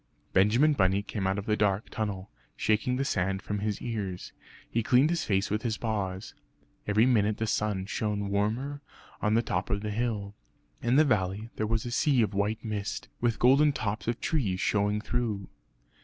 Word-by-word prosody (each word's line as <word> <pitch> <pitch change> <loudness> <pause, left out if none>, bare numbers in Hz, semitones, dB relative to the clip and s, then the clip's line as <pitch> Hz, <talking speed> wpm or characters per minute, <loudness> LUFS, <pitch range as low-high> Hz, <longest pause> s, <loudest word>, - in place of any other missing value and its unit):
Benjamin 115 +11 +4
Bunny 95 -5 +2
came 100 -2 -3
out 95 +1 0
of 100 - -4
the 105 - +2
dark 105 -1 0
tunnel, 100 -3 -4 0.2
shaking 110 +4 +1
the 135 +2 -1
sand 95 -2 -1
from 105 0 -3
his 105 0 -2
ears; 100 -6 -4 0.3
he 115 - 0
cleaned 130 +7 +4
his 170 - -1
face 100 -1 0
with 105 +1 0
his 110 -3 -1
paws. 100 -4 -3 0.5
Every 105 +2 +4
minute 110 -4 +2
the 110 - -1
sun 105 -3 -1
shone 105 -1 -2
warmer 120 +8 -1 0.4
on 105 +1 +2
the 115 - +3
top 90 -2 -2
of 100 +1 0
the 105 0 -3
hill. 105 -3 -2 0.5
In 120 +2 +2
the 155 +2 +6
valley 105 -2 0
there 110 - 0
was 115 +1 -1
a 120 - -4
sea 130 0 +3
of 105 - -2
white 105 +3 -1
mist, 105 -1 -4
with 115 -2 +1
golden 140 +4 +5
tops 105 -3 -3
of 120 0 -1
trees 105 - 0
showing 105 +1 +1
through. 110 -5 -2
105 Hz, 185 wpm, -29 LUFS, 100-120 Hz, 0.5 s, the